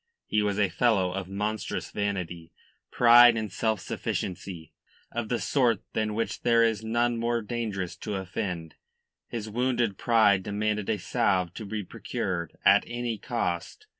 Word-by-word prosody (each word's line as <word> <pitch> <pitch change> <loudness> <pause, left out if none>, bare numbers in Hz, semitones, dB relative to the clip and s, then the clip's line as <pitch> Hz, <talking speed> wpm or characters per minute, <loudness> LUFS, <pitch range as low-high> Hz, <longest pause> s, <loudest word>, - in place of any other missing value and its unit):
He 105 - +1
was 105 -1 0
a 100 -1 +3
fellow 100 -4 +2
of 95 0 -4
monstrous 105 +2 -3
vanity, 90 -5 -3 0.4
pride 120 -1 +7
and 110 -3 -3
self 110 +1 0
sufficiency, 90 -2 -5 0.4
of 115 -2 -3
the 120 - +1
sort 120 -5 +1
than 110 -1 -1
which 115 +1 -2
there 115 -1 +4
is 110 -2 +1
none 120 +1 +1
more 115 0 0
dangerous 105 -6 -3
to 105 -2 -4
offend. 90 -3 -4 0.5
His 110 -2 -5
wounded 120 -2 0
pride 110 -5 +4
demanded 105 +1 -2
a 110 - +1
salve 95 -4 0
to 110 - -7
be 105 +1 -4
procured 85 -2 -4
at - - +6
any 120 -2 -3
cost. 85 - -3
105 Hz, 150 wpm, -27 LUFS, 95-115 Hz, 0.5 s, pride